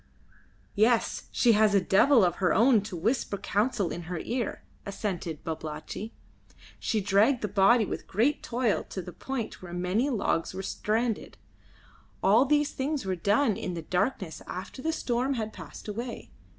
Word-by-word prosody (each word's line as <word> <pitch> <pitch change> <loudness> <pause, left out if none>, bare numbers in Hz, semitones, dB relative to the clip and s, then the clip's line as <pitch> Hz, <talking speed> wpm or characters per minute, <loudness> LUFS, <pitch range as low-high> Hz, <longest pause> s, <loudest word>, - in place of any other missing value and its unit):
"Yes, 225 +3 +2
she 240 - +4
has 215 -1 +4
a - - +6
Devil 200 +6 +5
of 175 -1 0
her 185 -2 +2
own 230 0 +5
to 200 - -6
whisper 210 +3 0
counsel 210 -2 0
in 175 - -4
her 180 - -3
ear," 240 +5 -3 0.2
assented 185 -6 -4
Babalatchi. 160 +7 -5 0.7
"She 215 - 0
dragged 210 +6 +3
the - - +1
body 205 +4 +4
with - - -5
great 235 +9 +1
toil 235 -3 0
to 190 - -5
the 180 - -9
point 265 -4 -5
where 175 -2 -9
many 180 +9 0
logs 195 -7 -1
were 190 - -4
stranded. 220 +3 -2 0.9
All 220 +7 +5
these 295 +1 +2
things 275 -2 -2
were 190 -1 -1
done 205 +6 +2
in 180 - -4
the 165 - -5
darkness 180 - -1
after 190 +8 -7
the 320 - 0
storm 260 -2 -1
had 220 -2 -3
passed - - -10
away. 230 +3 -6
215 Hz, 165 wpm, -28 LUFS, 185-245 Hz, 0.9 s, a